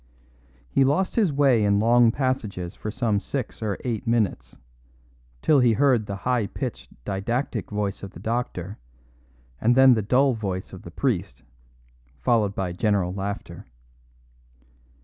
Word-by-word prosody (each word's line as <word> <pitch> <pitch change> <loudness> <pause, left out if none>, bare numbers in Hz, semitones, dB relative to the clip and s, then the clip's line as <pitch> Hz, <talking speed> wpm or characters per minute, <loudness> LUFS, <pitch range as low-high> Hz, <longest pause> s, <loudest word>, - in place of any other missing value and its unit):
He 135 - +2
lost 150 +8 +1
his 210 -8 +3
way 135 -6 +3
in 100 0 +3
long 115 +2 +5
passages 115 -9 -2
for 105 - -6
some 110 -2 0
six 125 +2 -5
or 105 -3 -2
eight 120 -2 -3
minutes: 115 -4 -1 0.9
till 150 -3 +5
he 120 -3 +4
heard 125 -4 +2
the 100 - -4
high 120 +1 0
pitched, - - -6 0.2
didactic 110 +3 -2
voice 105 -1 -3
of 100 - -7
the 85 - -13
doctor, 110 -3 -3 0.8
and 120 +2 +3
then 130 0 +7
the 110 - +1
dull 130 +6 +3
voice 95 -5 -4
of 95 - -9
the - - -10
priest, 100 -1 -2 0.7
followed 100 - +1
by 95 -2 -2
general 95 -1 0
laughter. 100 +1 -6
110 Hz, 145 wpm, -24 LUFS, 100-125 Hz, 0.9 s, then